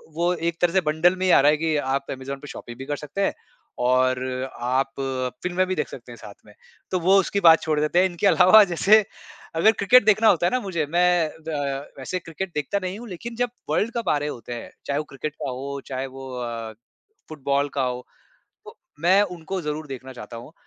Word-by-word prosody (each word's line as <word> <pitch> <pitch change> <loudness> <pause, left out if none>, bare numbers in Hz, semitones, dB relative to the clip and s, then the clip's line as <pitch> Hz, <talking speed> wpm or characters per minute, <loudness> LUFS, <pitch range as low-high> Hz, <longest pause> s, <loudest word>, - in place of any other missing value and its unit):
वो 175 +2 +1
एक 170 -1 -3
तरह 175 0 +2
से 190 - +4
बंडल 160 +4 +2
में 185 0 -2
ही 185 - +4
आ - - +7
रहा 145 - +5
है 150 - +1
कि 160 0 0
आप 140 -1 -2
अमेज़न 135 +1 -5
पे 145 - -11
शॉपिंग 120 -4 -9
भी 135 - -7
कर 145 - -2
सकते 150 +7 -5
हैं - - 0 0.5
और 130 +1 +2 0.4
आप 130 +2 0 0.5
फ़िल्में 180 +1 +1
भी 185 - -1
देख - - -1
सकते - - -11
हैं - - -9
साथ - - -11
में। - - -17 0.4
तो 185 - +1
वो 185 +3 +4
उसकी 200 +1 0
बात 165 -4 +7
छोड़ 155 -2 0
देते 155 +4 +2
हैं, 185 - +5
इनके 180 +2 0
अलावा 185 +4 +7
जैसे 210 +5 +5 0.5
अगर 190 +7 +5
क्रिकेट 225 +3 +5
देखना 215 +1 +4
होता 175 -4 +4
है - - 0
ना 255 - +1
मुझे, 175 -9 -2
मैं 175 +1 +2
व 160 +1 -9 0.5
वैसे 135 +7 -4
क्रिकेट 175 +2 -6
देखता 150 +7 -1
नहीं 185 +3 -4
हूँ 240 - -9
लेकिन 230 +6 -7
जब 245 0 0 0.2
वर्ल्ड 230 +3 +1
कप 235 - -2
आ 150 - +3
रहे 145 +1 -3
होते 120 -2 -7
हैं, 120 - -8
चाहे 140 - -1
वो - - -2
क्रिकेट 145 +2 -6
का - - -5
हो 140 +2 -5
चाहे 130 0 -3
वो 135 0 -10
अ, 115 -2 -5 0.6
फ़ुटबॉल 140 -1 -1
का 140 - 0
हो, 125 0 -3 0.6
तो - - -13 0.2
मैं 185 +5 +5
उनको 180 -1 -4
ज़रूर 150 +1 -4
देखना 130 -1 -8
चाहता 115 -1 -9
हूँ 120 +6 -11
160 Hz, 225 wpm, -24 LUFS, 135-185 Hz, 0.6 s, आ